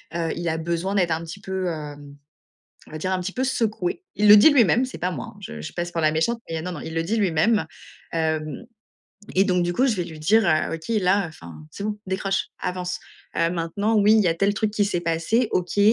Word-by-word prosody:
heu, 165 -1 -1
il 175 0 -3
a 160 - -1
besoin 170 +4 -2
d'être 180 -4 +2
un 160 0 0
petit 180 +5 -9
peu, 190 -1 -3
hem, 145 -3 -6 0.7
on - - -15
va 155 - -5
dire 185 +4 -2
un 185 - 0
petit 190 +2 -4
peu 255 - -1
secoué. 225 - -1
Il 210 - +3
le 205 - +11
dit 210 - +8
lui-même, 245 - +4
c'est 255 - -8
pas 180 +1 -1
moi, 150 - -5
hein. - - -18
Je 75 0 -7
je 75 - -6
passe 175 0 -3
pour 165 - -1
la 155 -1 +3
méchante, 165 +10 0
mais 165 -1 -3
non, 180 +2 -4
non, 150 - -7
il 160 - -7
le 165 - 0
dit 215 +7 -1
lui 200 -5 +2
même. 185 +4 +2 0.5
Hem, 155 +3 -2 0.7
et 190 - +5
donc 180 -2 +2
du 175 - 0
coup, 255 +9 +2
je 235 -5 +1
vais 180 - -1
lui 160 -2 -9
dire: 215 +8 +4
«Heu, 155 +1 +1
OK, 160 0 -8
là, 190 +1 +2
enfin, 85 - -12
c'est - - -8
bon, 210 0 -3
décroche, 190 +1 -1
avance», 180 0 -3 0.4
heu, 165 - +3
maintenant 180 +6 -1
oui, 205 +1 +5
il 220 - +5
y 180 - +2
a 165 - +1
tel 195 +4 +2
truc 215 0 0
qui 210 -1 +2
s'est 200 -4 -1
passé, 175 +8 +1
OK, 180 +2 -1
180 Hz, 250 wpm, -23 LUFS, 165-205 Hz, 0.7 s, le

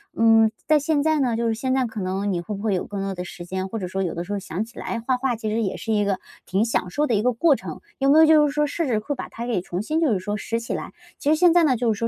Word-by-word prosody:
嗯， 225 -1 +5 0.2
在 305 0 +5
现 295 0 +1
在 315 0 +2
呢， 250 -4 +1
就 230 +1 0
是 225 - 0
现 260 +3 -1
在 260 -1 +2
可 220 - -7
能 195 +2 -1
你 175 - -1
会 175 +5 -5
不 200 - -7
会 210 -3 +1
有 180 - -2
更 200 -1 -5
多 195 -1 -3
的 180 - -4
时 175 0 -9
间？ 185 +1 -3
或 225 +4 -5
者 185 - -4
说 195 +1 -2
有 175 - -2
的 170 - -4
时 195 - -9
候 205 - -1
想 195 0 -4
起 230 - -18
来 235 - -3
画 250 +2 0
画 250 -1 0
其 220 -1 -4
实 220 +2 0
也 195 -4 -2
是 225 - -2
一 210 -1 +2
个， 200 -2 0 0.3
挺 195 +5 +1
享 180 -5 -1
受 295 +11 0
的 240 - 0
一 205 - +2
个 250 +3 +2
过 290 +5 +4
程， - - -7 0.2
有 275 0 +2
没 295 - +6
有 320 - +8
就 305 -1 +6
是 - - -2
说 300 0 +2
试 310 +1 -2
试 225 -4 +1
会， 280 +7 -4
把 - - -6
它 235 - -6
给 230 -7 -1
重 180 +1 -4
新 310 +8 -1
就 310 -6 +3
是 200 - +1
说 205 +3 -3
拾 230 +3 -2
起 230 - -5
来？ - - -5 0.3
其 290 - 0
实 310 - +5
现 340 +1 +5
在 350 - +5
呢 275 -5 +3
就 230 -1 +1
是 - - -8
说 230 - -1
225 Hz, 375 characters per minute, -23 LUFS, 195-275 Hz, 0.3 s, 有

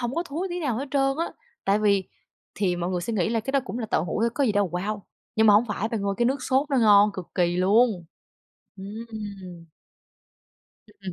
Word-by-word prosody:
hổng 240 +1 -2
có 335 - 0
thúi 345 +4 -4
tí 350 0 -3
nào 260 -8 -1
hết 275 +4 -3
trơn 270 -1 +1
á. 335 - -2 0.3
Tại 200 +1 +3
vì 200 -2 +2 0.5
thì 185 -3 0
mọi 175 +1 -2
người 180 -1 -1
sẽ 230 +6 -4
nghĩ 185 -5 +1
là 225 0 0
cái 270 +5 -5
đó 275 - +3
cũng 245 - -5
là 225 - -3
tàu - - 0
hủ 180 - -3
thôi 230 +1 +2
có 285 - +1
gì 225 - +2
đâu 205 -1 +1
wow, 200 +4 -3 0.4
nhưng 220 - +4
mà 210 - +7
hông 210 +3 +5
phải 210 0 -2
bạn 225 -3 -3
ơi, 200 0 -1
cái 240 - +1
nước 265 +2 0
sốt 270 +4 +1
nó 275 - +2
ngon 210 -3 +6
cực 185 -3 -7
kỳ 175 -1 +1
luôn! 200 0 +3 0.7
Ừm. 200 -4 -8 1.3
Ừm. 190 -2 -6
215 Hz, 230 wpm, -25 LUFS, 195-250 Hz, 1.3 s, mà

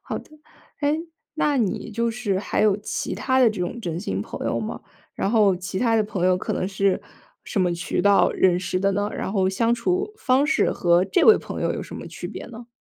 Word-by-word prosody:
好 - - -4
的。 - - -15 0.5
诶， 295 +2 +1 0.3
那 295 -2 +1
你 220 -1 -1
就 230 +2 0
是 220 -5 -1
还 200 - -1
有 210 -2 +4
其 205 - -4
他 260 -1 +1
的 250 -3 +6
这 210 -4 -4
种 180 +7 -3
真 170 -4 -3
心 95 - -3
朋 - - -6
友 115 - 0
吗？ 110 - -5 0.3
然 195 - -1
后 205 -5 +4
其 180 +1 -5
他 230 0 +2
的 220 - +3
朋 185 -3 -1
友 185 0 +4
可 - - -3
能 185 - -1
是 195 -1 +1 0.4
什 195 - -1
么 180 -1 +2
渠 170 0 -2
道 200 -1 +5
认 180 -2 +3
识 185 - -2
的 195 +1 +1
呢？ 205 +1 0
然 - - -4
后 190 -3 +2
相 230 +5 +1
处 370 - -1
方 275 - +2
式 315 0 +2
和 175 +1 +3
这 190 - +2
位 440 - +8
朋 - - -6
友 - - +1
有 - - -4
什 - - -9
么 - - -8
区 - - -7
别 - - -7
呢？ 235 0 -10
205 Hz, 255 characters per minute, -23 LUFS, 185-240 Hz, 0.5 s, 位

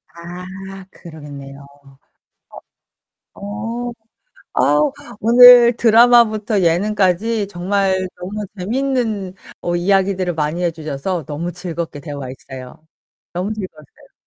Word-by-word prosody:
아 185 +3 -9
그러겠네요. 140 -4 -11 1.7
어. 225 +4 -5 0.7
어. 295 -2 +3
아 285 - -13
오늘 240 +1 +8
드라마부터 225 -2 +4
예능까지 200 +4 +1
정말 190 0 -1
너무 205 +3 -5
재밌는 220 -3 -2 0.3
어 175 0 -1
이야기들을 190 -1 +1
많이 155 +3 -2
해주셔서 160 0 -3
너무 165 +4 -4
즐겁게 170 -4 -6
대화했어요. 135 0 -9 0.5
너무 185 +5 -2
즐거웠어요. 165 -8 -11
190 Hz, 235 characters per minute, -18 LUFS, 165-215 Hz, 1.7 s, 오늘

